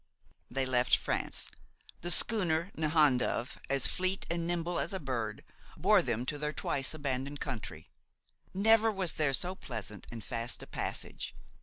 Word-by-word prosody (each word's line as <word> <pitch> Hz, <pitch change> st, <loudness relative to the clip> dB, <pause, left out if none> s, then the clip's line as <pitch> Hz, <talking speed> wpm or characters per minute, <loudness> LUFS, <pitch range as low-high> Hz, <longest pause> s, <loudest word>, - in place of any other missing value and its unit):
They 135 Hz, +2 st, 0 dB
left 125 Hz, -1 st, +4 dB
France. -, -, 0 dB, 0.5 s
The 175 Hz, -, -3 dB
schooner 175 Hz, -3 st, +2 dB
Nahandove, 150 Hz, -6 st, +2 dB
as 135 Hz, -2 st, +3 dB
fleet 185 Hz, +1 st, +1 dB
and 170 Hz, -1 st, -1 dB
nimble 175 Hz, 0 st, 0 dB
as -, -, -2 dB
a 190 Hz, -, -2 dB
bird, 115 Hz, -, -3 dB, 0.3 s
bore -, -, +5 dB
them 120 Hz, +3 st, -1 dB
to 145 Hz, +2 st, -3 dB
their 150 Hz, +1 st, -1 dB
twice 135 Hz, +1 st, -1 dB
abandoned 140 Hz, -1 st, -2 dB
country. 105 Hz, -9 st, -5 dB, 0.6 s
Never 225 Hz, +3 st, +5 dB
was 190 Hz, -4 st, 0 dB
there 150 Hz, -3 st, +1 dB
so 180 Hz, +6 st, +2 dB
pleasant 110 Hz, -, -6 dB
and 115 Hz, -2 st, -7 dB
fast 115 Hz, 0 st, -3 dB
a -, -, -7 dB
passage. -, -, -3 dB
145 Hz, 150 wpm, -32 LUFS, 125-175 Hz, 0.6 s, bore